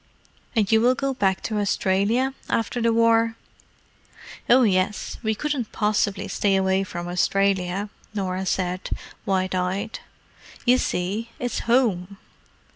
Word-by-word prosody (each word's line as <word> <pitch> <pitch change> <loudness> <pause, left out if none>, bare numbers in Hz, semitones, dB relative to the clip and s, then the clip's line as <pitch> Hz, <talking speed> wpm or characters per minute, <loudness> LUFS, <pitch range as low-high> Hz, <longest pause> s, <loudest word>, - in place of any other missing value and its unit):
"And 215 -2 +2
you 220 0 +5
will 250 +2 +4
go 275 +1 -1
back 195 -7 +1
to 215 -1 -1
Australia 205 +6 +1 0.2
after 230 +2 -1
the 230 0 +3
war?" 230 0 +3 1.1
"Oh, 255 +2 +7
yes. 190 -1 0
We 220 -2 0
couldn't 280 -3 -2
possibly 205 -1 0
stay 195 +1 +1
away 190 0 +2
from 175 -2 -6
Australia," 190 +1 +1 0.2
Norah 190 -2 -2
said, 180 0 -1 0.4
wide 185 -1 +1
eyed. 185 +4 -2 0.7
"You 250 +1 +5
see, 200 +6 -2
it's 245 -1 -2
home." 200 -6 +2
205 Hz, 125 wpm, -24 LUFS, 190-230 Hz, 1.1 s, Oh